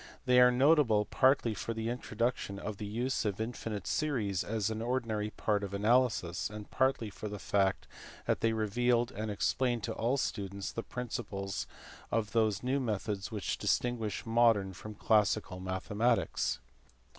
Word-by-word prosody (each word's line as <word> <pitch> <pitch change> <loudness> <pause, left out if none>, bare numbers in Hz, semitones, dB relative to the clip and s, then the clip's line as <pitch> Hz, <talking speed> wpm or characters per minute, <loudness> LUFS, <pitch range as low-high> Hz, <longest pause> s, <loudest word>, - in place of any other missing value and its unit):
They 125 -1 +5
are 125 0 +8
notable 125 -5 +4
partly 130 -4 +3
for 110 +3 -4
the 110 +1 -2
introduction 120 -3 -2
of 100 0 -5
the 105 - -5
use 120 +6 -1
of 105 -2 -2
infinite 110 -3 -4
series 110 - 0
as 110 -1 -1
an 110 0 -3
ordinary 115 -3 -1
part 105 -1 -1
of 100 0 -4
analysis, 110 -5 +2
and 105 0 -8
partly 130 -5 +1
for 105 - -6
the 105 - -5
fact 95 0 0 0.4
that - - +1
they 115 - +3
revealed 120 +2 +1
and 110 +1 -4
explained 120 +3 0
to - - -2
all 120 +5 0
students 100 -6 -3
the 115 - -3
principles 105 -6 -4 0.4
of 110 -2 0
those 110 -3 +1
new 130 +3 +1
methods 105 -4 -2
which 105 -3 -3
distinguish 115 -4 0
modern 115 -4 +3
from 105 +3 -9
classical 105 -3 +2
mathematics. 95 +5 0
110 Hz, 155 wpm, -32 LUFS, 100-120 Hz, 0.4 s, are